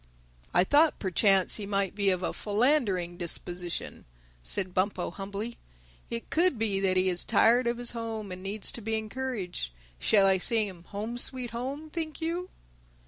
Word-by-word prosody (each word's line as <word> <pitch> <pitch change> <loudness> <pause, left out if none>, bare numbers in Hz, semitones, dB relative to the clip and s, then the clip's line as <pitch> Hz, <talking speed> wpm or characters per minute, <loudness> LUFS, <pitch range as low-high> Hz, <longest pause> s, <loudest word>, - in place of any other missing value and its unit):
"I 175 - +5
thought 295 - +4
perchance 195 0 +3
he 205 -2 -5
might 200 -2 0
be 200 -1 +2
of 185 -1 0
a - - -1
philandering 205 - +1
disposition," 175 0 -4 0.4
said 180 - -4
Bumpo 190 +3 0
humbly. 205 +4 -5 0.5
"It 230 0 -5
could 340 -4 +3
be 215 -3 0
that 190 -1 +2
he 185 +1 +3
is 180 -1 +1
tired 240 +2 +4
of 235 0 0
his 240 -1 -2
home 225 -3 -5
and 180 0 -6
needs 200 +2 -1
to 235 - -7
be 220 +1 -1
encouraged. 220 - -4 0.3
Shall 200 - +4
I 190 -1 +4
sing 220 +2 +3
him 175 -3 -10
'Home 215 +5 -4
Sweet 250 -1 +1
Home,' 275 +6 -5
think 315 -2 -4
you?" 340 +3 -2
210 Hz, 170 wpm, -29 LUFS, 190-240 Hz, 0.5 s, I